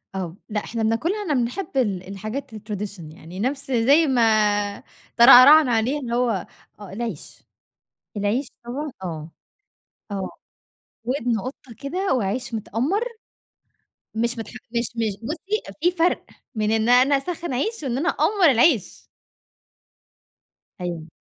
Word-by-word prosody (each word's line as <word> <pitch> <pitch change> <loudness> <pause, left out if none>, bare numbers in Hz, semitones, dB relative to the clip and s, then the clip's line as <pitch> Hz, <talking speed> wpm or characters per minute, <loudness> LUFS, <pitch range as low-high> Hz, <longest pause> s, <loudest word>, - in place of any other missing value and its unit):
آه 180 -2 -4
لأ 210 -1 -2
إحنا 230 -1 -3
بناكلها 315 - 0
إحنا 350 -7 -1
بنحب 265 +5 -2
ال 195 -8 0
الحاجات 215 +8 -6
الtradition 210 -2 -6
يعني، 170 +4 -10
نفس 270 +4 -2
زي 275 +7 +4
ما 215 -5 +2 0.3
ترعرعنا 255 +4 +9
عليها 235 +6 +1
اللي 240 -4 -3
هو 245 0 +2 0.5
آه 205 -2 -10
العيش، 225 -6 -6 0.7
العيش 210 +7 0 0.2
هو 285 +5 -4
آه، 160 -2 -6 0.8
آه 195 -2 -3 0.7
ودن 245 -2 -1
قطَّة 255 0 -8
كده 355 +7 -1
وعيش 240 +1 -2
متأمّر 250 - -1 1.1
مش 235 +2 -1
متح 225 -2 -6 0.2
مش 235 -1 -1
مش 220 -4 -1
بُصّي 350 - -3 0.2
في 350 - +3
فرق 350 0 +1 0.3
من 215 -1 0
إن 220 +1 +1
أنا 255 +3 +5
أسخّن 335 +1 -4
عيش، 430 - -2
وإن 255 -2 -1
أنا 330 +5 +1
أأمّر 385 -8 +3
العيش. 245 - +2 1.8
أيوه 170 -3 -4
240 Hz, 125 wpm, -23 LUFS, 210-280 Hz, 1.8 s, ترعرعنا